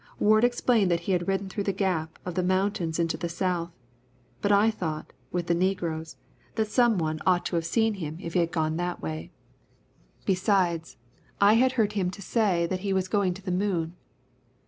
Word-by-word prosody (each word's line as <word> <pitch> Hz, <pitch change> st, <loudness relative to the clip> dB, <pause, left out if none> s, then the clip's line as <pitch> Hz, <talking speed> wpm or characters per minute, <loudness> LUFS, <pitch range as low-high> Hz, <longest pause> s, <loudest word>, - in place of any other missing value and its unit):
Ward 215 Hz, +1 st, +4 dB
explained 240 Hz, -4 st, +3 dB
that 170 Hz, -1 st, +1 dB
he 180 Hz, -, -2 dB
had 175 Hz, -2 st, 0 dB
ridden 195 Hz, 0 st, 0 dB
through 200 Hz, +1 st, -4 dB
the 195 Hz, -, +2 dB
gap 180 Hz, -5 st, -1 dB
of 180 Hz, -, -3 dB
the 185 Hz, -, 0 dB
mountains 185 Hz, -3 st, 0 dB
into 165 Hz, -1 st, 0 dB
the 170 Hz, -, -3 dB
South, 170 Hz, -1 st, -1 dB, 0.7 s
but 205 Hz, -, +2 dB
I 205 Hz, +2 st, +5 dB
thought, 160 Hz, -7 st, -5 dB, 0.2 s
with 175 Hz, -1 st, -1 dB
the 170 Hz, -, +1 dB
negroes, 170 Hz, -3 st, -1 dB, 0.4 s
that 220 Hz, -1 st, +1 dB
someone 185 Hz, -12 st, +2 dB
ought 180 Hz, -2 st, +2 dB
to -, -, -2 dB
have 165 Hz, -1 st, 0 dB
seen 225 Hz, +4 st, +2 dB
him 160 Hz, -5 st, -5 dB
if 170 Hz, -3 st, -6 dB
he -, -, +3 dB
had 170 Hz, -1 st, +1 dB
gone 155 Hz, -1 st, 0 dB
that 175 Hz, 0 st, -2 dB
way; 80 Hz, +1 st, -5 dB, 1.0 s
besides, 185 Hz, -4 st, +1 dB, 0.4 s
I 200 Hz, +1 st, +6 dB
had 255 Hz, +3 st, +4 dB
heard 215 Hz, -5 st, +1 dB
him 185 Hz, -3 st, 0 dB
say 195 Hz, -2 st, +1 dB
that 185 Hz, +2 st, -2 dB
he 195 Hz, +1 st, -1 dB
was 190 Hz, -1 st, 0 dB
going 190 Hz, -3 st, +1 dB
to 190 Hz, -, -11 dB
the 185 Hz, -, -3 dB
moon. 180 Hz, -3 st, -1 dB
185 Hz, 190 wpm, -27 LUFS, 170-200 Hz, 1.0 s, I